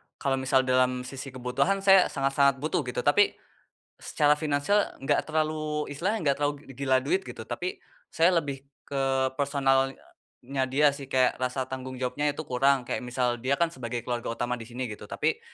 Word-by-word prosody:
kalau 135 -1 -1
misal 130 0 +2
dalam 130 -1 +2
sisi 130 0 -8
kebutuhan, 140 +11 0
saya 195 -1 +7
sangat-sangat 135 0 +1
butuh, 155 - 0
gitu. 125 0 -3
Tapi, 205 +8 +4 0.6
secara 150 -1 +2
finansial 155 +7 +1
nggak 135 - +1
terlalu, 155 -1 -1
istilahnya 185 +10 -1
nggak 140 - +3
terlalu 145 0 0 0.2
gila 130 -1 +2
duit, 380 +3 0
gitu. - - -9
Tapi, 380 +3 -4 0.3
saya 170 +2 +4
lebih 140 -4 -1 0.2
ke 135 -1 0
personalnya 135 -1 -1
dia 145 +2 +4
sih, 140 -2 -9
kayak 130 -2 +2
rasa 130 +1 -1
tanggung 130 0 -6
jawabnya 130 +4 -1
itu 145 +2 -3
kurang, 135 0 +2
kayak - - -3
misal, 125 -1 -1
dia 135 +3 +1
kan 170 -1 +1
sebagai 120 -4 -5
keluarga 120 -1 -3
utama 120 0 -2
disini, 120 +3 -5
gitu. 105 -4 -8
Tapi, - - -1
135 Hz, 165 wpm, -27 LUFS, 130-150 Hz, 0.6 s, saya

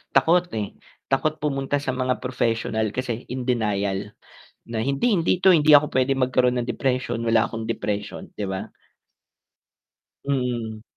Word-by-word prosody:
takot, 170 +6 +4
eh, 105 -2 -3 0.4
takot 155 +3 +1
pumunta 140 -1 -1
sa 140 -2 -2
mga 130 0 0
professional 115 -3 0
kasi 125 -2 -3
in 125 0 -3
denial, 105 -4 -1 0.5
na, 110 -1 -2
"Hindi, 140 - +1
hindi 170 +2 +1
ito 190 - +6
hindi 155 -1 +4
ako 145 +1 +7
pwede 130 +1 +2
magkaroon 125 -1 +2
ng 120 - -6
depression, 130 -3 -1
wala 115 0 +3
akong 115 -1 -5
depression.", 105 -2 -4
'di 105 - -2
ba? 95 0 -4 1.6
Mm. 120 -5 -2
125 Hz, 140 wpm, -24 LUFS, 110-135 Hz, 1.6 s, ako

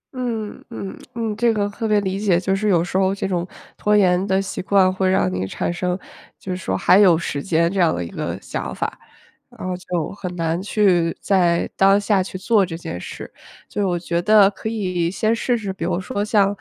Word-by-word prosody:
嗯 230 -4 -4
嗯 195 - -6 0.2
嗯， 225 -2 -2
这 235 +2 +2
个 205 -2 0
特 225 +2 -4
别 210 -1 +3
理 190 0 -2
解， 195 -5 +2
就 190 +1 0
是 210 +2 0
有 170 -4 +3
时 175 +2 -2
候 190 0 +2
这 195 - -3
种 180 -2 -2 0.3
拖 210 0 +2
延 185 -2 +3
的 190 0 +2
习 195 - -4
惯 190 0 +3
会 190 0 +1
让 95 - +2
你 95 +1 -2
产 170 - -2
生， 180 +1 -1 0.4
就 190 - -6
是 - - -1
说 95 - -2
还 185 - +5
有 185 -5 +6
时 145 -3 -3
间 170 -1 +1
这 195 - -1
样 170 -3 +4
的 85 - -3
一 - - -6
个 - - -4
想 - - -5
法。 - - -4 0.6
然 - - -5
后 180 - -2
就 180 -3 -3
很 185 -3 -6
难 165 0 -1
去 185 -4 +2
在 175 -3 +2
当 195 +1 +5
下 205 -1 +2
去 185 - -7
做 200 +1 +2
这 165 -2 -6
件 90 - -6
事， - - -8 0.4
就 205 -1 -1
我 180 -2 0
觉 170 0 -1
得 205 +1 +6
可 205 +2 -6
以 185 -6 -1
先 215 +3 +1
试 245 +1 0
试， 205 -4 -4
比 185 -3 -6
如 175 +1 -1
说 205 0 -3
像， 210 -2 +3
190 Hz, 240 characters per minute, -21 LUFS, 175-205 Hz, 0.6 s, 有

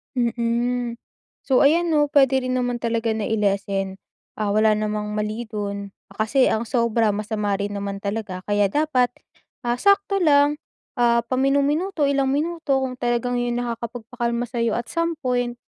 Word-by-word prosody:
Mm. 240 0 0 0.5
So, 260 -2 +3
ayan 335 +4 +3
'no 295 -1 +3
pwede 270 -2 +5
rin 255 0 -1
naman 245 -1 -1
talaga 230 -1 0
na-i-lessen, 200 -3 -1 0.4
ah, 210 -1 0
wala 215 0 +4
namang 210 0 -2
mali 215 +2 -3
do'n 200 -1 -4 0.2
ah, - - -15
kasi 260 +4 +3
ang 220 - +1
sobra 230 -2 +1
masama 210 -1 -2
rin 205 0 -3
naman 200 0 -4
talaga 200 -2 -4
kaya 205 -1 +2
dapat, 280 -4 +2 0.5
ah, 240 0 0
sakto 400 0 +3
lang, 290 -1 +4 0.4
ah, 235 -2 +3
paminu-minuto, 285 +7 +1
ilang 275 -1 +1
minuto 315 -1 0
kung 255 -1 -3
talagang 240 0 0
yon 240 0 -1
nakakapagpakalma 235 0 -3
sa'yo 230 -2 -1
at 235 - -3
some 335 0 -1
point. 245 -3 -1
240 Hz, 150 wpm, -23 LUFS, 215-270 Hz, 0.5 s, pwede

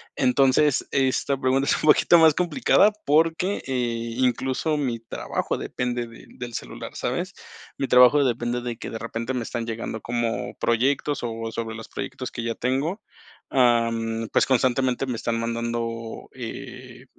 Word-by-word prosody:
Entonces, 135 +2 +3
esta 135 0 +1
pregunta 135 +1 +1
es - - +3
un 155 - +3
poquito 170 +3 +6
más 160 -2 +6
complicada 205 +3 +3
porque, 165 +6 +2
eh, 120 -3 -2
incluso 130 +4 0
mi 125 -5 -1
trabajo 115 - -3
depende 125 -1 -3
de 115 0 -14
del 120 -1 -8
celular, - - -7
¿sabes? - - -2 0.4
Mi 135 - -1
trabajo 125 +4 +6
depende 120 0 -1
de 120 -1 -4
que - - -6
de 115 - -5
repente 115 +2 -4
me 125 -2 -2
están 115 0 -4
llegando 115 -1 -4
como 120 -1 -2
proyectos, 135 +4 +1
o 115 -1 -4
sobre 115 -1 -4
los 115 -1 -8
proyectos 130 -1 -5
que 120 - -5
ya 115 0 -2
tengo. 140 - -1 0.5
Am, 115 -3 +2
pues, - - +4
constantemente 130 0 +1
me 125 - -2
están 115 0 -2
mandando, 115 0 -3
eh, 125 +1 -8
125 Hz, 155 wpm, -24 LUFS, 115-135 Hz, 0.5 s, poquito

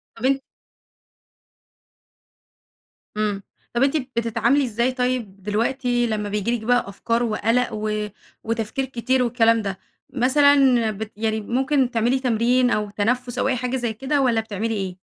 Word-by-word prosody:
طب 225 - -5
أن 270 +1 +3 2.8
إمم، 210 -2 -1 0.3
طب 240 +2 +2
أنتِ 280 +3 +2
بتتعاملي 240 0 0
إزاي 235 +2 0
طيب 250 -7 -2
دلوقتي 240 +3 0
لمّا 210 -2 -2
بييجي 210 +3 0
لِك 220 - -10
بقى 245 -2 +2
أفكار 230 +4 -1
وقلق 230 +2 +1
و 215 0 -2 0.4
وتفكير 230 +3 -2
كتير 255 0 0
والكلام 230 -1 +3
ده؟ 195 -2 -4 0.3
مثلًا 265 -3 +4
بت 215 +1 -6
يعني 220 0 -1
ممكن 260 +3 +1
تعملي 240 +3 +1
تمرين 245 0 +2
أو 210 -3 0
تنفس 245 +4 -1
أو - - +1
أي 265 - +1
حاجة 250 +1 -2
زي 240 -3 -2
كده، 270 +5 0
والّا 235 -4 +2
بتعملي 220 +1 -3
إيه؟ 190 -4 -4
235 Hz, 145 wpm, -22 LUFS, 215-255 Hz, 2.8 s, مثلًا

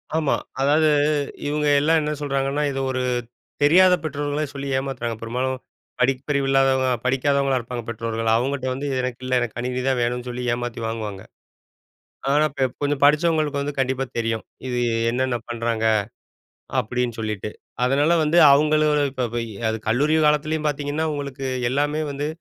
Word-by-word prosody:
ஆமா. 160 -3 +2 0.3
அதாவது 150 +3 +4 0.6
இவங்க 150 0 0
எல்லாம் 160 +3 +3
என்ன 150 0 -2
சொல்றாங்கன்னா, 140 0 -1
இத 135 - -3
ஒரு 130 0 -1 0.6
தெரியாத 180 +5 +6
பெற்றோர்களே 145 0 -2
சொல்லி 140 0 -5
ஏமாத்துறாங்க. 130 -4 -3
பெரும்பாலும் 125 +3 -2 0.4
படிப்பறிவு 135 +2 +1
இல்லாதவங்க, 135 -1 +3 0.2
படிக்காதவங்களா 135 +1 +2
இருப்பாங்க 120 0 -6
பெற்றோர்கள். 115 0 -2
அவங்ககிட்ட 130 +2 -1
வந்து 140 +3 -4
எனக்கு 125 -1 -4
இல்ல 130 0 +2
எனக்கு 120 -2 -3
கணினி 125 +1 -2
தான் 130 -2 +2
வேணும்னு 120 +1 -1
சொல்லி 125 0 -4
ஏமாத்தி 120 -1 -4
வாங்குவாங்க. 110 -4 -5 1.1
ஆனா 150 +2 +4
இப் 140 - -22
இப்போ 125 - -4
கொஞ்சம் 145 -1 0
படிச்சவங்களுக்கு 150 0 +3
வந்து 145 +1 -3
கண்டிப்பா 135 0 0
தெரியும். 115 -1 -1 0.2
இது 125 -1 -1 0.3
என்னென்ன 130 +1 0
பண்றாங்க? 115 -1 -1 0.9
அப்டின்னு 120 0 -2
சொல்லிட்டு. 105 -2 -3 0.3
அதனால 140 +6 +3
வந்து 155 +3 +2 0.2
அவங்கள 155 +2 +3 0.3
இப்ப 130 -2 -2
போயி 115 -1 -2 0.2
அது 110 - -1
கல்லூரி 140 +8 +2
காலத்துலேயும் 150 +1 +1
பார்த்தீங்கன்னா, 145 +2 -2
உங்களுக்கு 140 -2 -5 0.2
எல்லாமே 145 +3 0
வந்து 145 +1 -3
135 Hz, 145 wpm, -23 LUFS, 120-145 Hz, 1.1 s, தெரியாத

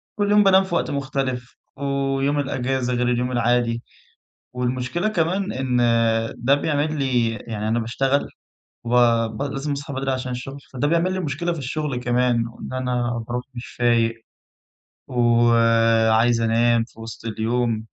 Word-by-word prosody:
كل 205 -1 0
يوم 210 0 +6
بانام 195 -1 +5
في 190 -2 -4
وقت - - 0
مختلِف 135 -3 -3 0.2
ويوم 140 +1 0
الإجازة 130 -2 -1
غير 125 0 0
اليوم 125 +1 0
العادي، 120 -1 +1 0.7
والمشكلة 125 +8 -1
كمان 190 0 0
إن 125 -2 0
آآ 115 -1 +2
ده 130 +4 +3
بيعمل 150 +1 -1
لي 125 -4 +1
يعني 110 -1 -5
أنا 115 +2 +1
باشتغل 135 +5 0 0.6
وب 115 -2 +2
لازم 140 +1 -3
أصحى 140 0 -4
بدري 135 0 -2
عشان 130 -1 -3
الشغل 130 +3 -6 0.2
فده 135 +3 0
بيعمِل 170 +4 +1
لي 185 - -2
مشكلة 170 +1 -2
في 165 - -6
الشغل 140 0 -3
كمان 120 -1 +1
وإن 115 +2 -9
أنا 125 -2 -1
بارُوح 125 +1 -3
مش 120 - -6
فايق 115 -1 +1 0.9
و 120 -1 +3
آآ، 115 -1 +4
عايز 115 +1 +3
أنام 115 +1 +3
في 115 - -16
وسط 115 0 -9
اليوم، 115 0 -1
125 Hz, 155 wpm, -22 LUFS, 115-140 Hz, 0.9 s, يوم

